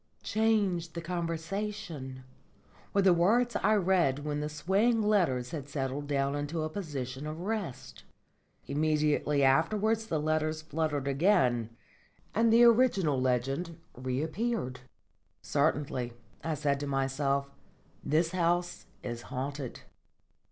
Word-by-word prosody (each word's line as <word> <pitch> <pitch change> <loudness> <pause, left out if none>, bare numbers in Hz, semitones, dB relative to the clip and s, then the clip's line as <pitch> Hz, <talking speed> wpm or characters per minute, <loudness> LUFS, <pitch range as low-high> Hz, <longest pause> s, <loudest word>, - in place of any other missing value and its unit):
"Change 200 -7 +1
the 170 - -4
conversation," 165 -4 -4 0.7
were 200 - +2
the 190 -2 +6
words 230 +8 +3
I 215 +2 +3
read 175 -8 +2
when 150 -1 -1
the 150 0 -2
swaying 200 +9 +2
letters 170 -13 +2
had 145 -3 -6
settled 140 0 -3
down 140 -1 0
into 145 +3 -2
a 155 - -3
position 145 -6 -5
of 155 +2 -5
rest. 200 - -4 0.6
Immediately 150 -1 +1
afterwards 215 +11 +2
the 160 - 0
letters 155 +1 0
fluttered 150 -3 -2
again 135 - +2 0.6
and 225 +1 +3
the 235 +1 +7
original 215 - +4
legend 135 +7 -1 0.2
reappeared. 145 - -2 0.6
"Certainly," 130 -4 0 0.3
I 160 -1 -1
said 140 -1 0
to 145 - -4
myself, 140 0 0 0.5
"this 160 +3 +1
house 175 -1 0 0.2
is 120 -1 -4
haunted." 135 0 -4
155 Hz, 115 wpm, -30 LUFS, 140-190 Hz, 0.7 s, the